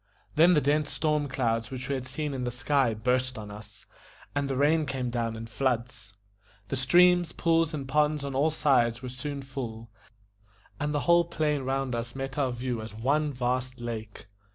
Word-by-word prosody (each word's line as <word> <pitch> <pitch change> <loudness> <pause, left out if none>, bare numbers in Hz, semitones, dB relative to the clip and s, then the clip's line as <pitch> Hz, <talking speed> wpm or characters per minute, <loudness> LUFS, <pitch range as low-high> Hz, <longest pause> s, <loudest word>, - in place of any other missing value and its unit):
Then 170 +3 +6
the 150 - +4
dense 145 +1 +1
storm 150 -2 0
clouds 115 -3 -1
which 130 0 -6
we 140 - -1
had 130 -1 -3
seen 145 +2 -3
in 130 -2 -3
the 125 - -1
sky 130 -1 +1
burst 125 +3 0
on 105 -1 -7
us, 105 +1 -12 0.5
and 140 -1 -1
the 135 - -1
rain 150 +3 +3
came 130 -2 -2
down 115 -2 -1
in 110 0 -6
floods. 120 -2 -2 0.6
The - - -1
streams, 175 +5 +4
pools, 165 -1 +2
and 140 -4 -5
ponds 150 +1 +1
on 140 - -4
all 140 +4 +3
sides 130 -6 +2
were 125 - -4
soon 140 +2 -5
full, 115 -5 -6 0.9
and 150 +1 -1
the 145 -1 0
whole 170 +5 +4
plain 155 -4 0
round 135 0 -1
us 120 +1 -4
met 135 +1 -4
our 135 -3 +1
view 120 -1 -3
as 110 0 -8
one 145 +6 +1
vast 125 0 -2
lake. 110 -3 -6
130 Hz, 190 wpm, -28 LUFS, 120-150 Hz, 0.9 s, Then